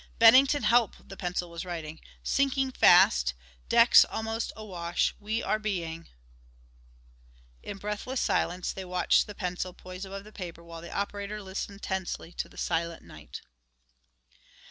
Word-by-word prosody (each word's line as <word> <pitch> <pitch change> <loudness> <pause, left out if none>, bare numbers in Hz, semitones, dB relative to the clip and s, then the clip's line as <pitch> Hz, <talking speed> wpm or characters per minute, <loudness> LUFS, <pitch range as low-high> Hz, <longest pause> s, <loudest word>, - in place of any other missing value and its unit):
"Bennington 260 +4 +7
help," 230 0 +3
the 195 - -9
pencil 180 -2 -3
was 170 0 -5
writing, 160 -3 -6 0.2
"sinking 270 -1 +1
fast 60 - +5 0.3
decks - - +8
almost 225 +1 -3
awash 175 -6 -2
we 220 +3 -2
are 215 - 0
being 170 -6 -4 0.8
" - - -30
In - - -7
breathless 210 +6 -4
silence 180 +1 0
they 190 - -6
watched 180 -1 +2
the 205 - -9
pencil, 180 -1 -3
poised 185 +1 -9
above 195 +1 -7
the 215 - -14
paper 170 -4 -8
while 165 -1 -10
the 170 - -9
operator 205 +1 -3
listened 200 +1 -6
tensely 190 -3 -3
to - - -5
the - - -18
silent 170 0 -2
night. 75 -1 -11
185 Hz, 145 wpm, -28 LUFS, 170-210 Hz, 0.8 s, decks